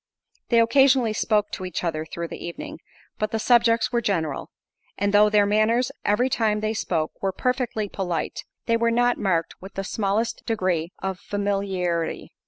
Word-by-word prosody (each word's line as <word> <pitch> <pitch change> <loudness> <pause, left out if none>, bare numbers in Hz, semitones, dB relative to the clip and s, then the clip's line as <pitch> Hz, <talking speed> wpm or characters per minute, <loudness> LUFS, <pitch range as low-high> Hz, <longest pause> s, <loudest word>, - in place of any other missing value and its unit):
They 235 - +5
occasionally 255 -1 +4
spoke 210 -1 +1
to - - -5
each 180 -1 -4
other 160 -2 -2
through 170 +1 -5
the - - -8
evening, 170 - -7 0.4
but 215 - 0
the 225 - -1
subjects 230 0 +3
were 240 -1 +1
general—and 195 +2 -4
though 210 +1 +6
their 210 -1 +4
manners 215 +4 +2
every 225 +5 +2
time 220 -4 +1
they 215 0 0
spoke, 165 -7 -1
were 195 - 0
perfectly 245 0 -1
polite, 180 -5 -3 0.2
they 230 0 +2
were 235 0 +2
not 245 +1 +2
marked 170 -5 -1
with 190 +1 -11
the 195 - -2
smallest 220 +3 -1
degree 185 -6 0
of 190 -1 -2
familiarity. 195 -4 -2
210 Hz, 165 wpm, -24 LUFS, 185-230 Hz, 0.4 s, though